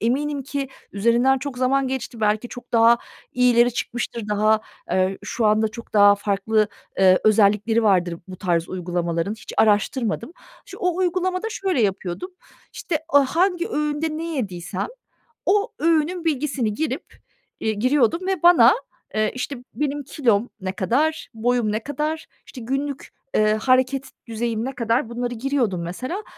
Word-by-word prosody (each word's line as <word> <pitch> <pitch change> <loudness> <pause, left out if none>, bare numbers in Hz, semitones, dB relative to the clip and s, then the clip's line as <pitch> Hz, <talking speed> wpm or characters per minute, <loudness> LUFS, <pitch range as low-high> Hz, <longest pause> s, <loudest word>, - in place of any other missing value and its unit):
eminim 280 +5 0
ki 275 0 -4 0.2
üzerinden 235 +6 +3
çok 270 -2 -6
zaman 265 +1 +2
geçti. 260 -3 -5
Belki 215 +3 +1
çok 245 0 -11
daha 230 +1 +6 0.3
iyileri 245 -1 +4
çıkmıştır. 235 -2 -4
Daha, 215 +1 +3 0.3
eee, 185 +1 +1
şu 225 -3 0
anda 215 +1 +3
çok 230 +2 -11
daha 205 0 +7
farklı, 205 +1 0 0.3
ııı, 185 -1 +6
özellikleri 215 +1 +3
vardır 180 -5 +2
bu 185 - -8
tarz 170 -3 0
uygulamaların. 175 0 -2
Hiç 220 - -11
araştırmadım. 220 +4 +1 0.3
Ş 385 - -11
o 360 -1 0
uygulamada 370 +2 0
şöyle 375 - 0
yapıyordum. 195 - -2 0.4
İşte, 315 -5 -2
a 285 -2 +5
hangi 360 -1 +2
öğünde 300 +1 -1
ne 330 - -4
yediysem 185 -4 -3 0.6
o 415 +4 +2
öğünün 330 +2 +1
bilgisini 275 -7 0
girip, 315 +7 -3 0.5
iii, 220 -2 -2
giriyordum 290 - +2
ve 380 -4 -1
bana, 295 -9 +7 0.4
eee, 215 0 +1
işte, 275 +2 -3 0.2
benim 290 0 -2
kilom 240 -5 +1
ne 185 0 -2
kadar, 265 +12 0
boyum 230 -1 +1
ne 215 +1 -2
kadar, 305 +3 -3 0.2
işte, 250 - -10
günlük, 275 +3 -3 0.3
eee, 215 0 +4
hareket 260 +3 +1 0.2
düzeyim 230 0 -2
ne 270 - -5
kadar, 235 +1 0
bunları 245 +1 -3
giriyordum 240 -7 -1
mesela. 255 - -5
240 Hz, 145 wpm, -22 LUFS, 210-290 Hz, 0.6 s, daha